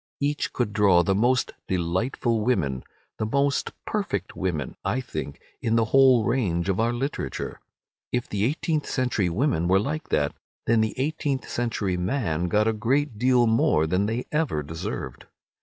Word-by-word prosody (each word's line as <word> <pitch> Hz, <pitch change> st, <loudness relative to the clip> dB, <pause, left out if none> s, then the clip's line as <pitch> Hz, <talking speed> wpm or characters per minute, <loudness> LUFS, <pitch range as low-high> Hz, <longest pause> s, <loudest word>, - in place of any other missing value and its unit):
Each 145 Hz, +1 st, -1 dB
could 120 Hz, -5 st, -1 dB
draw 95 Hz, -5 st, +5 dB
the 95 Hz, -, +2 dB
most 120 Hz, +5 st, +2 dB, 0.2 s
delightful 105 Hz, +6 st, 0 dB
women—the 90 Hz, -, -2 dB
most 140 Hz, +3 st, +1 dB, 0.2 s
perfect 150 Hz, -, -2 dB
women, 80 Hz, -8 st, -2 dB
I 130 Hz, -, 0 dB
think, 100 Hz, -, -6 dB, 0.2 s
in 115 Hz, 0 st, +1 dB
the 115 Hz, -1 st, +3 dB
whole 130 Hz, -4 st, +6 dB
range 100 Hz, -8 st, 0 dB
of 95 Hz, -, 0 dB
our 115 Hz, +1 st, +2 dB
literature. 135 Hz, +4 st, -4 dB, 0.5 s
If 125 Hz, 0 st, -1 dB
the 100 Hz, -1 st, -2 dB
eighteenth 155 Hz, +3 st, -1 dB
century 125 Hz, -8 st, 0 dB
women 90 Hz, -, +1 dB
were 95 Hz, +2 st, +4 dB
like 150 Hz, +8 st, -3 dB
that, 75 Hz, 0 st, +1 dB, 0.3 s
then 115 Hz, -1 st, +3 dB
the 110 Hz, -, -1 dB
eighteenth 140 Hz, -1 st, -1 dB
century 110 Hz, -6 st, -1 dB
men 90 Hz, -, -1 dB
got 105 Hz, +5 st, +2 dB
a 110 Hz, -, +2 dB
great 120 Hz, +2 st, 0 dB
deal 125 Hz, 0 st, +4 dB
more 110 Hz, -8 st, +3 dB
than 90 Hz, +5 st, +1 dB
they 115 Hz, +3 st, -2 dB
ever 150 Hz, -, 0 dB
deserved. 80 Hz, +3 st, -6 dB
115 Hz, 155 wpm, -25 LUFS, 90-130 Hz, 0.5 s, whole